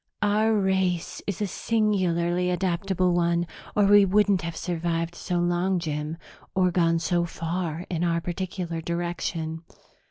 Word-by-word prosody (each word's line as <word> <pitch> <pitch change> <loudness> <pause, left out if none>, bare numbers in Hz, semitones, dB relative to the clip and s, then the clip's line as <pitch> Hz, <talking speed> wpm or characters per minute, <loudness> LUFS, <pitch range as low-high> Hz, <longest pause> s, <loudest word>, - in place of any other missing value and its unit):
"Our 215 +2 +3
race 190 -3 0
is 200 +1 -2
a - - +2
singularly 180 -5 +1
adaptable 180 0 0
one 170 0 +2 0.3
or 205 - +4
we 205 0 +7
wouldn't 200 0 +3
have 170 -1 -4
survived 170 -1 -2
so 175 +1 -3
long, 175 +2 +1
Jim, 155 -1 -3 0.4
or 185 -1 +3
gone 165 -2 +3
so 170 +1 +1
far 170 0 -3
in 170 -1 -2
our 170 -1 +1
particular 175 -1 -4
direction. 170 -1 -3
175 Hz, 135 wpm, -26 LUFS, 170-190 Hz, 0.4 s, we